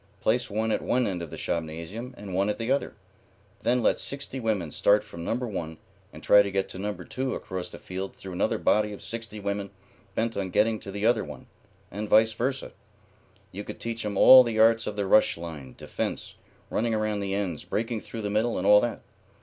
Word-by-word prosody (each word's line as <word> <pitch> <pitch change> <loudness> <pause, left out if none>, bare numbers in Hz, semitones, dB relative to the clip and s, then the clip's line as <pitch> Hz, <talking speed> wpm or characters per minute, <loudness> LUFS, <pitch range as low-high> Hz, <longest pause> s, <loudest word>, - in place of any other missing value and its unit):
Place 120 +4 +1
one 110 +2 -1
at - - 0
one 125 0 +1
end 90 -5 -2
of 85 - -6
the - - -8
shopnasium 85 +10 -4
and 100 -2 -8
one 100 +3 +1
at 105 - -1
the 115 +2 -2
other. 140 - 0 0.7
Then 125 0 +1
let - - +3
sixty 140 -1 -5
women 105 -9 -1
start 105 +1 +3
from 85 -6 -9
number 125 +7 -1
one 80 -6 -5 0.3
and - - -12
try 105 - +7
to 100 - -1
get 95 0 -1
to 95 - -7
number 105 +1 -4
two 130 0 -3
across 95 -1 -5
the - - -8
field 95 +1 -6
through 95 -1 -9
another 90 - 0
body 105 0 +2
of 100 - -10
sixty 115 0 -6
women 100 0 -3 0.5
bent 115 0 0
on 95 -2 -2
getting 110 +4 +2
to 100 - -8
the 100 +2 -3
other 115 -2 +3
one, - - -9 0.5
and 105 +2 -5
vice 110 +1 +5
versa. 130 +4 -2 0.8
You 100 +2 -6
could - - -8
teach 115 0 -4
'em 105 -2 -3
all 130 +5 +10
the 115 -3 -1
arts 115 +1 +4
of 105 - -3
the 100 -1 -1
rush 100 -1 +4
line, 80 -7 -8
defence, - - -4 0.4
running 115 0 0
around 110 -1 -1
the 100 -1 -2
ends, 95 -6 -2
breaking 115 0 -2
through 115 - -7
the 105 - -2
middle, 110 +3 +1
and 90 - -2
all 105 0 +7
that. 120 -1 -2
105 Hz, 215 wpm, -27 LUFS, 95-115 Hz, 0.8 s, all